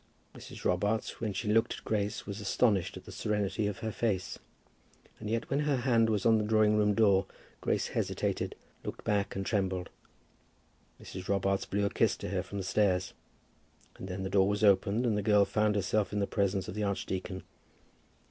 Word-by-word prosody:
Mrs. -, -, -11 dB
Robarts, 105 Hz, +5 st, 0 dB
as 105 Hz, -4 st, -2 dB
she 105 Hz, -, -3 dB
looked 115 Hz, 0 st, +3 dB
at -, -, -12 dB
Grace, 105 Hz, 0 st, -1 dB
was 100 Hz, +1 st, -6 dB
astonished 100 Hz, -2 st, +1 dB
at -, -, -12 dB
the -, -, -10 dB
serenity 105 Hz, 0 st, -1 dB
of 105 Hz, -1 st, -3 dB
her 110 Hz, -, -1 dB
face. 105 Hz, -5 st, -2 dB, 0.8 s
And 105 Hz, -, -5 dB
yet 115 Hz, +1 st, -1 dB
when 140 Hz, -, 0 dB
her 150 Hz, -1 st, +1 dB
hand 120 Hz, -3 st, +3 dB
was 105 Hz, -3 st, 0 dB
on 110 Hz, -1 st, +5 dB
the -, -, 0 dB
drawing 105 Hz, 0 st, +3 dB
room 105 Hz, -1 st, +3 dB
door 100 Hz, -4 st, +4 dB, 0.3 s
Grace -, -, 0 dB
hesitated, -, -, -2 dB, 0.3 s
looked -, -, -6 dB
back, 100 Hz, -1 st, 0 dB
and 95 Hz, 0 st, -3 dB
trembled. 95 Hz, -4 st, -1 dB, 1.1 s
Mrs. 95 Hz, -1 st, -8 dB
Robarts 100 Hz, 0 st, 0 dB
blew 100 Hz, +1 st, 0 dB
a 100 Hz, -, 0 dB
kiss -, -, +2 dB
to -, -, -5 dB
her -, -, 0 dB
from 100 Hz, -, -7 dB
the 95 Hz, -, -2 dB
stairs; 95 Hz, -1 st, +1 dB, 0.8 s
and 95 Hz, -, -7 dB
then 95 Hz, +1 st, -4 dB
the 95 Hz, -, -4 dB
door 95 Hz, 0 st, +4 dB
was 105 Hz, +1 st, -1 dB
opened, 100 Hz, +3 st, +4 dB
and 115 Hz, -3 st, +2 dB
the 105 Hz, -, 0 dB
girl 105 Hz, 0 st, +4 dB
found 105 Hz, 0 st, +1 dB
herself 105 Hz, +1 st, 0 dB
in 105 Hz, -, -2 dB
the 100 Hz, -, +2 dB
presence 100 Hz, -1 st, 0 dB
of -, -, -5 dB
the 105 Hz, -, -3 dB
archdeacon. 95 Hz, -1 st, -3 dB
100 Hz, 195 wpm, -31 LUFS, 95-110 Hz, 1.1 s, on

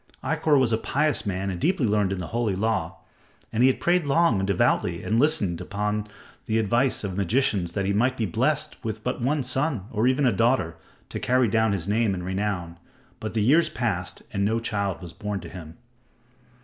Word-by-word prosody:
Ikkor 155 Hz, 0 st, +2 dB
was 120 Hz, -4 st, +2 dB
a 110 Hz, -, +1 dB
pious 145 Hz, -1 st, 0 dB
man 95 Hz, 0 st, -2 dB
and 90 Hz, -, -5 dB
deeply 175 Hz, -6 st, +2 dB
learned 105 Hz, -3 st, +1 dB
in 95 Hz, -, -1 dB
the 90 Hz, -, -5 dB
Holy 115 Hz, -4 st, 0 dB
Law; 105 Hz, -5 st, -1 dB, 0.6 s
and 110 Hz, -, +1 dB
he 130 Hz, -, +7 dB
had 130 Hz, -, 0 dB
prayed 175 Hz, -3 st, +2 dB
long 145 Hz, -, +3 dB
and 95 Hz, -, -1 dB
devoutly 100 Hz, -3 st, +1 dB
and -, -, -5 dB
had 115 Hz, +2 st, +4 dB
listened 100 Hz, -, +1 dB
unto 105 Hz, 0 st, -2 dB, 0.4 s
the 110 Hz, -, +1 dB
advice 120 Hz, +5 st, +1 dB
of 95 Hz, -3 st, -3 dB
magicians 100 Hz, -3 st, 0 dB
that 100 Hz, -2 st, -1 dB
he 100 Hz, -, +1 dB
might 125 Hz, +5 st, +1 dB
be 115 Hz, -, 0 dB
blessed 85 Hz, -, -1 dB
with -, -, -4 dB
but -, -, -2 dB
one 140 Hz, +3 st, +1 dB
son, 130 Hz, -, 0 dB
or 110 Hz, +2 st, +1 dB
even 130 Hz, +2 st, +2 dB
a 125 Hz, -, +4 dB
daughter, 115 Hz, -6 st, +1 dB, 0.3 s
to -, -, -4 dB
carry 125 Hz, 0 st, +2 dB
down 110 Hz, +1 st, +2 dB
his 95 Hz, -3 st, -2 dB
name 105 Hz, -1 st, +1 dB
and 90 Hz, -1 st, -5 dB
renown. 95 Hz, -3 st, -3 dB, 0.4 s
But 110 Hz, +1 st, -5 dB
the 110 Hz, -, +2 dB
years 155 Hz, +7 st, +4 dB
passed 95 Hz, -7 st, -3 dB
and 100 Hz, -1 st, 0 dB
no 110 Hz, +3 st, +1 dB
child 100 Hz, -5 st, -2 dB
was 85 Hz, -1 st, -9 dB
born 105 Hz, -1 st, -4 dB
to -, -, -9 dB
him. 85 Hz, -3 st, -10 dB
110 Hz, 210 wpm, -25 LUFS, 95-130 Hz, 0.6 s, he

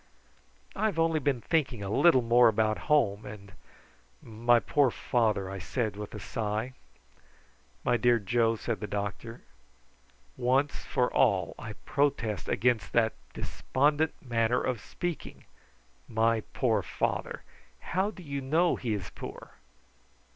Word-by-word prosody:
"I 215 Hz, -, 0 dB
have 200 Hz, -, -3 dB
only 165 Hz, -1 st, +2 dB
been 135 Hz, -4 st, 0 dB
thinking 130 Hz, -9 st, 0 dB
a 100 Hz, -, -4 dB
little 130 Hz, -1 st, +5 dB
more 120 Hz, +1 st, +6 dB
about 110 Hz, -1 st, +1 dB
home, 110 Hz, -9 st, +3 dB
and 100 Hz, -2 st, -10 dB, 0.7 s
my 120 Hz, -, +2 dB
poor 140 Hz, +2 st, +2 dB
father," 110 Hz, -5 st, 0 dB
I 95 Hz, 0 st, -6 dB
said 110 Hz, +3 st, -2 dB
with 105 Hz, 0 st, -7 dB
a -, -, -6 dB
sigh. 110 Hz, +3 st, -3 dB, 1.1 s
"My 120 Hz, -, +2 dB
dear 120 Hz, +1 st, +4 dB
Joe," 115 Hz, +2 st, +1 dB
said 115 Hz, 0 st, -3 dB
the 105 Hz, -, -4 dB
doctor, 105 Hz, +4 st, -5 dB, 0.9 s
"once 135 Hz, +4 st, 0 dB
for 125 Hz, -1 st, 0 dB
all 100 Hz, -9 st, +2 dB
I 110 Hz, -1 st, -6 dB
protest 115 Hz, -8 st, 0 dB
against 120 Hz, -3 st, +1 dB
that 115 Hz, -2 st, +3 dB, 0.2 s
despondent 150 Hz, +3 st, 0 dB
manner 120 Hz, -1 st, +1 dB
of 125 Hz, -5 st, -2 dB
speaking. 175 Hz, -2 st, -6 dB, 0.7 s
`My 115 Hz, 0 st, +2 dB
poor 110 Hz, -5 st, +1 dB
father!' -, -, -3 dB, 0.5 s
How 190 Hz, +3 st, +2 dB
do 190 Hz, -4 st, -11 dB
you 140 Hz, -2 st, -4 dB
know 160 Hz, +6 st, +2 dB
he 115 Hz, -4 st, -2 dB
is 95 Hz, -4 st, -6 dB
poor? -, -, -9 dB
120 Hz, 135 wpm, -29 LUFS, 110-140 Hz, 1.1 s, more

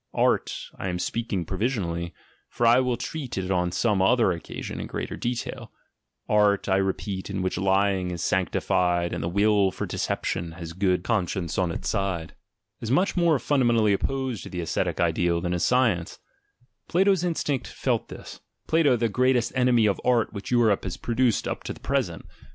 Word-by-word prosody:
{Art, -, -, 0 dB
I 95 Hz, -, -2 dB
am 90 Hz, -, -2 dB
speaking 100 Hz, -2 st, -2 dB
provisionally, 90 Hz, -5 st, -2 dB, 0.4 s
for 120 Hz, -, -1 dB
I 120 Hz, +2 st, +6 dB
will 125 Hz, -2 st, 0 dB
treat 135 Hz, -1 st, -5 dB
it 95 Hz, 0 st, -2 dB
on 90 Hz, -1 st, +1 dB
some 100 Hz, +2 st, +1 dB
other 115 Hz, +1 st, +4 dB
occasion 85 Hz, -1 st, -6 dB
in -, -, -5 dB
greater -, -, -4 dB
detail, 120 Hz, 0 st, -4 dB, 0.3 s
— -, -, -57 dB, 0.3 s
art, 105 Hz, -1 st, +3 dB
I 95 Hz, -1 st, +3 dB
repeat, 95 Hz, 0 st, -2 dB
in 95 Hz, -2 st, -2 dB
which 95 Hz, -, -1 dB
lying 95 Hz, -1 st, +1 dB
is 85 Hz, -1 st, -4 dB
sanctified 90 Hz, -1 st, +1 dB
and -, -, -3 dB
the 85 Hz, -, -1 dB
will 100 Hz, +1 st, +3 dB
for -, -, -4 dB
deception 85 Hz, -1 st, -2 dB
has 85 Hz, -1 st, -8 dB
good 90 Hz, -1 st, +1 dB
conscience 95 Hz, -6 st, -1 dB
on 90 Hz, -2 st, +1 dB
its -, -, -5 dB
side, 95 Hz, -6 st, -2 dB, 0.5 s
is 115 Hz, -, -5 dB
much 180 Hz, +10 st, +2 dB
more 170 Hz, -4 st, +3 dB
fundamentally 120 Hz, -5 st, +2 dB
opposed 130 Hz, +2 st, -2 dB
to -, -, -8 dB
the 90 Hz, -, -4 dB
ascetic 80 Hz, -, -2 dB
ideal 85 Hz, -1 st, +1 dB
than 90 Hz, +1 st, -2 dB
is 90 Hz, -, -1 dB
science: 115 Hz, -10 st, +1 dB, 0.7 s
Plato's 190 Hz, 0 st, +3 dB
instinct 150 Hz, -6 st, -1 dB
felt -, -, -1 dB
this -, -, -10 dB
— -, -, -49 dB
Plato, 155 Hz, -5 st, +4 dB
the 115 Hz, 0 st, +1 dB
greatest 125 Hz, +2 st, +2 dB
enemy 125 Hz, -3 st, +3 dB
of 100 Hz, -2 st, +1 dB
art 120 Hz, -3 st, +2 dB
which 100 Hz, -1 st, -6 dB
Europe 115 Hz, -5 st, +3 dB
has 95 Hz, -, -4 dB
pro 120 Hz, -, -4 dB
duced 120 Hz, -1 st, +2 dB
up -, -, -3 dB
to -, -, -3 dB
the -, -, -15 dB
present. -, -, -2 dB
100 Hz, 185 wpm, -25 LUFS, 90-120 Hz, 0.7 s, I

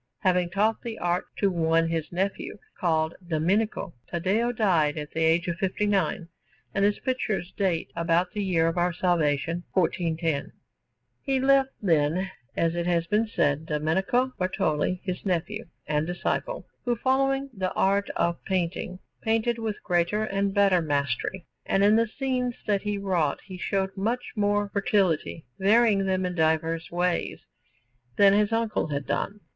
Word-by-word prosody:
Having 180 Hz, -2 st, +2 dB
taught 210 Hz, +5 st, +1 dB
the 230 Hz, -2 st, -6 dB
art 175 Hz, +1 st, 0 dB
to 200 Hz, -2 st, +2 dB
one 165 Hz, -1 st, +2 dB
his 165 Hz, -1 st, -2 dB
nephew, 190 Hz, +3 st, -2 dB, 0.2 s
called 160 Hz, -2 st, +1 dB
Domenico, 180 Hz, +4 st, 0 dB
Taddeo 195 Hz, +8 st, 0 dB
died 175 Hz, -10 st, +2 dB
at 150 Hz, -1 st, -5 dB
the 160 Hz, -, -3 dB
age 165 Hz, +2 st, +3 dB
of 170 Hz, -1 st, -2 dB
fifty 190 Hz, +3 st, -1 dB
nine; 190 Hz, -4 st, 0 dB, 0.5 s
and 195 Hz, -, +1 dB
his 205 Hz, 0 st, +3 dB
pictures 215 Hz, -8 st, -2 dB
date 185 Hz, -5 st, 0 dB
about 170 Hz, +1 st, +1 dB
the 210 Hz, -1 st, -2 dB
year 170 Hz, -4 st, +2 dB
of 165 Hz, +2 st, 0 dB
our 175 Hz, +1 st, +2 dB
salvation 165 Hz, -1 st, 0 dB
1410. 165 Hz, -4 st, 0 dB, 0.7 s
He 270 Hz, -2 st, 0 dB
left, 270 Hz, 0 st, +4 dB
then, 170 Hz, +2 st, +2 dB, 0.3 s
as 165 Hz, 0 st, +2 dB
it 175 Hz, 0 st, -2 dB
has 170 Hz, -1 st, +1 dB
been 210 Hz, +6 st, +1 dB
said, 150 Hz, -6 st, 0 dB
Domenico 190 Hz, +12 st, +1 dB
Bartoli, 180 Hz, -1 st, 0 dB
his 185 Hz, -2 st, -4 dB
nephew 190 Hz, +4 st, -2 dB, 0.2 s
and 150 Hz, +1 st, 0 dB
disciple, 180 Hz, -, -2 dB, 0.2 s
who, 240 Hz, -1 st, +1 dB
following 270 Hz, +2 st, +1 dB
the 185 Hz, -3 st, -2 dB
art 200 Hz, +1 st, +2 dB
of 170 Hz, 0 st, 0 dB
painting, 180 Hz, 0 st, -2 dB, 0.2 s
painted 225 Hz, +1 st, +1 dB
with 220 Hz, -2 st, -4 dB
greater 175 Hz, +4 st, +1 dB
and 200 Hz, -1 st, 0 dB
better 195 Hz, -3 st, +4 dB
mastery, 145 Hz, +4 st, -1 dB, 0.2 s
and 195 Hz, -, +1 dB
in 210 Hz, +2 st, +6 dB
the 230 Hz, +1 st, +3 dB
scenes 250 Hz, 0 st, -2 dB
that 205 Hz, -2 st, +1 dB
he 210 Hz, -1 st, -2 dB
wrought 180 Hz, -7 st, 0 dB
he 185 Hz, -, -8 dB
showed 190 Hz, +1 st, -2 dB
much 230 Hz, +6 st, -2 dB
more 205 Hz, -1 st, +1 dB
fertility, 195 Hz, -, +1 dB
varying 205 Hz, 0 st, +4 dB
them 185 Hz, -1 st, +1 dB
in 180 Hz, -, -2 dB
diverse 160 Hz, 0 st, 0 dB
ways, 175 Hz, 0 st, -1 dB, 0.7 s
than 200 Hz, -1 st, +6 dB
his 210 Hz, +1 st, +3 dB
uncle 225 Hz, -5 st, 0 dB
had 140 Hz, -2 st, -3 dB
done. 205 Hz, +1 st, -2 dB
185 Hz, 155 wpm, -26 LUFS, 165-210 Hz, 0.7 s, in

